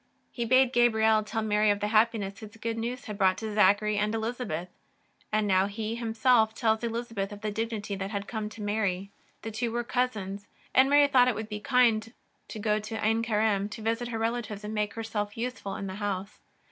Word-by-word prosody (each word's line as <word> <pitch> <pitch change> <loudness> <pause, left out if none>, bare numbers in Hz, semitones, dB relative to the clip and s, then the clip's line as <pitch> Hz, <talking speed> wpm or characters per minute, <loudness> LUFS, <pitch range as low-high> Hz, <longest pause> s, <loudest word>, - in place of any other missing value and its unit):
He 235 - -3
bade 255 +1 +4
Gabriel 220 -2 +4
tell 215 +1 -3
Mary 210 0 +2
of 205 0 +2
the 210 0 -1
happiness 215 -3 +2
his 215 0 -11
good 230 +1 -3
news 235 +3 -4
had 210 -1 -7
brought 190 -1 +4
to 220 0 -4
Zachary 210 +1 +3
and 210 +1 0
Elizabeth, 220 -7 -3 0.6
and 215 0 +2
now 190 0 +3
He 215 +2 -4
Him 230 -1 -4
self 225 -2 +4
tells 220 -1 +1
Elizabeth 230 -3 -3
of 205 0 -9
the 215 -1 -2
dignity 220 -1 -3
that 195 0 -4
had 200 -1 -4
come 215 -2 -4
to 215 0 -9
Mary. 200 -2 -1 0.3
The 225 - -4
two 225 +2 -2
were 240 +1 -1
cousins, 210 -6 -2 0.3
and 265 +1 +5
Mary 290 0 +6
thought 255 -3 +5
it 250 - +1
would 220 +1 -5
be 210 -1 -4
kind 230 -3 +2 0.4
to - - -7
go 210 0 +1
to 215 +1 -6
Ain 225 +1 +2
Karim 210 -3 +1
to 215 +1 -8
visit 230 +2 -1
her 235 -1 -3
relatives 225 -2 -2
and 210 +1 -5
make 210 -1 -1
herself 215 -2 -3
useful 230 -5 -4
in 200 - -5
the 190 - -5
house. 200 0 -4
220 Hz, 210 wpm, -28 LUFS, 205-230 Hz, 0.6 s, Mary